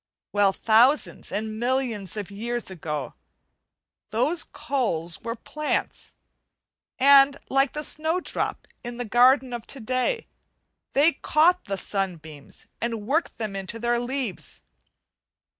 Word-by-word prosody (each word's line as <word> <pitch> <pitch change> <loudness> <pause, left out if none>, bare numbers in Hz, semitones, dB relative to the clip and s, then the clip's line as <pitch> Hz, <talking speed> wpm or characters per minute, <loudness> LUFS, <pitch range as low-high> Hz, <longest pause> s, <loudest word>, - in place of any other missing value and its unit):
Well, 205 -1 +4
thousands 235 +9 +3
and 215 +1 -3
millions 235 -6 -1
of 205 -1 -5
years 235 +1 -4
ago, 150 -7 -4 1.0
those 260 +11 +1
coals 235 - -2
were 230 -1 -4
plants; 305 +6 -3 0.8
and 275 +1 +6
like 270 +1 +2
the 300 - -3
snowdrop 320 +4 -1 0.2
in 240 -1 -6
the 245 - -3
garden 250 +3 +4
of 235 -2 -6
to 275 - -5
day, 255 - -1 0.7
they 295 +5 +5
caught 335 +6 +3
the 195 -1 -3
sunbeams 165 -8 -5 0.2
and 230 -3 -3
worked 305 +8 0
them 215 -3 -4
into 195 +3 -5
their 240 +1 0
leaves. 245 -5 -4
240 Hz, 120 wpm, -25 LUFS, 205-275 Hz, 1.0 s, and